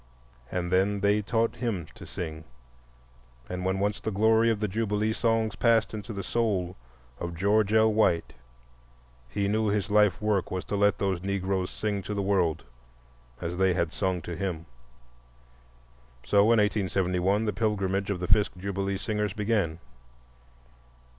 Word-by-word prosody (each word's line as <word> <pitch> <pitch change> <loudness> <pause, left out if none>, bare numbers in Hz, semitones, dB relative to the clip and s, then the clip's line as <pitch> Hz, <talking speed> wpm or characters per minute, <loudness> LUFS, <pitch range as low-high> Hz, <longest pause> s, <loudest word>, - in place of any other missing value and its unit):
And 90 -1 -2
then 100 +2 +2
they 100 +1 +3
taught 115 +2 0
him 115 -9 -2
to - - -12
sing, 80 -2 -6 1.0
and 90 +5 -4
when 95 +1 0
once 100 +1 -1
the - - -2
glory 110 +2 +3
of 110 -2 0
the 105 - 0
Jubilee 105 +1 0
songs 115 -1 0
passed 115 -2 +2
into 105 +1 -6
the 100 -2 -5
soul 95 -5 -1 0.4
of 85 -1 -4
George 100 +3 +2
L. 110 0 +4
White, 90 -6 +2 1.0
he 100 +10 -1
knew 110 +2 +1
his 100 0 -1
life 105 -3 +4
work 105 -3 0
was 95 0 -4
to - - -3
let 100 0 +3
those 95 -3 -1
Negroes 95 -1 -1
sing 105 -2 -2
to 105 +2 -5
the 100 - -1
world 90 -5 +1 0.8
as 85 0 -3
they 95 -1 +3
had 85 -3 -1
sung 95 -3 -1
to 85 - -5
him. 85 -2 -3 1.6
So 100 +11 +3
in 115 +1 +4
1871 95 -1 +1
the 105 - -1
pilgrimage 100 -2 -1
of 100 -3 -1
the 90 - -3
Fisk 105 -2 +3
Jubilee 100 +1 -2
Singers 105 0 -2
began. 105 -6 0
100 Hz, 155 wpm, -27 LUFS, 90-105 Hz, 1.6 s, L